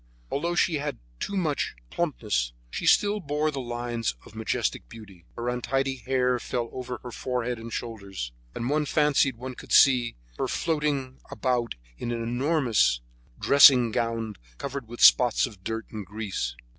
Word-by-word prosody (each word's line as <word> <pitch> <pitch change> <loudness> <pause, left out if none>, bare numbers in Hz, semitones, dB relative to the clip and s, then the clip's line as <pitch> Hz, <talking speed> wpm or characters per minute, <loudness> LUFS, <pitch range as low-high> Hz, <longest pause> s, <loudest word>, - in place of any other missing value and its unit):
Although 170 +5 -1
she 170 -2 +2
had 145 0 -3 0.2
too 200 - -3
much 155 -6 -1 0.2
embonpoint, 105 - -1 0.2
she - - -3
still 205 +1 +4
bore 150 -2 -1
the 140 - -4
lines 120 - -3
of - - -14
majestic - - -2
beauty; 100 -6 -13
her 120 +1 -4
untidy 135 +2 -1
hair 125 0 +1
fell 120 -1 -3
over 125 -1 -5
her 125 - -7
forehead 125 -1 -2
and 115 +1 -8
shoulders, 100 - -5 0.2
and 115 - -3
one 150 +2 +1
fancied 145 -4 +3
one 130 +2 -6
could - - -12
see 125 -4 +5 0.2
her - - 0
floating 145 -5 -1
about 125 -3 -1 0.2
in 120 - -3
an 115 -1 -2
enormous 120 - +2 0.4
dressing 130 -4 +7
gown 115 -3 -2 0.2
covered 140 -3 -5
with 120 +1 -8
spots 125 -3 +6
of 105 -7 -11
dirt 110 +1 -3
and 105 -4 -6
grease. 100 - -3
125 Hz, 155 wpm, -27 LUFS, 115-140 Hz, 0.4 s, dressing